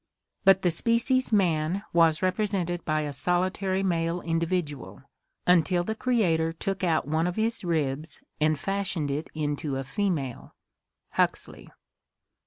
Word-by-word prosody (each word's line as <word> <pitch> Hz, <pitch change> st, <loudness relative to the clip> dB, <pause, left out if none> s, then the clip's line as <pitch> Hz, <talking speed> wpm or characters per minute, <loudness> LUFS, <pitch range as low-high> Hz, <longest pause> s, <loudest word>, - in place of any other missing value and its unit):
But 190 Hz, 0 st, +6 dB
the 175 Hz, -, +3 dB
species 235 Hz, +7 st, +1 dB
man 180 Hz, -2 st, +1 dB
was 165 Hz, -1 st, +4 dB
represented 185 Hz, -2 st, 0 dB
by 155 Hz, 0 st, +1 dB
a 145 Hz, -1 st, -4 dB
solitary 185 Hz, +5 st, 0 dB
male 170 Hz, -2 st, 0 dB
individual, 165 Hz, -4 st, -2 dB, 0.4 s
until 180 Hz, 0 st, +3 dB
the 220 Hz, -, -2 dB
Creator 180 Hz, -10 st, +1 dB
took 195 Hz, +3 st, -4 dB
out 160 Hz, -5 st, +1 dB
one 160 Hz, +3 st, +1 dB
of 180 Hz, -, -3 dB
his 225 Hz, 0 st, 0 dB
ribs 155 Hz, -3 st, -2 dB, 0.2 s
and 155 Hz, 0 st, +2 dB
fashioned 190 Hz, -4 st, -2 dB
it 150 Hz, +3 st, -3 dB
into 145 Hz, -2 st, -2 dB
a 135 Hz, -, -2 dB
female" 145 Hz, -, -3 dB, 0.6 s
(Huxley). -, -, -1 dB
170 Hz, 130 wpm, -27 LUFS, 155-195 Hz, 0.6 s, But